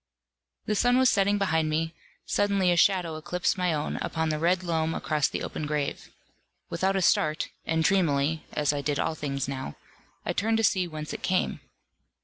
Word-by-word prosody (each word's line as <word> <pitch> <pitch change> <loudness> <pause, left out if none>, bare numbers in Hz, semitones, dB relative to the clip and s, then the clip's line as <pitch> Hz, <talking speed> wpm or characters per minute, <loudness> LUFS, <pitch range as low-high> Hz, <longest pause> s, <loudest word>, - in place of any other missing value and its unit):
The 215 - 0
sun 245 +4 +3
was 260 -1 +5
setting 200 +1 +2
behind 160 -5 +1
me: 160 +1 -1 0.3
suddenly 200 -3 +2
a - - +3
shadow 175 -3 +2
eclipsed 180 +3 -1
my 180 -2 0
own 150 -1 -2
upon 160 -1 -2
the 155 -1 -1
red 180 +3 +2
loam 165 -2 0
across 150 -3 +1
the - - -4
open 150 - -4
grave. 150 -1 -3 0.6
Without 190 +3 0
a 190 - +1
start, 155 -2 +2 0.2
and 160 0 +1
dreamily 160 -4 +2
(as 150 0 +1
I 145 - -2
did 145 0 -1
all - - 0
things 140 -3 -3
now), 135 -1 -5 0.5
I - - -1
turned 220 +2 +1
to 225 - 0
see 185 -4 +2
whence 155 -2 -6
it - - -6
came. 185 0 0
165 Hz, 185 wpm, -27 LUFS, 155-190 Hz, 0.6 s, was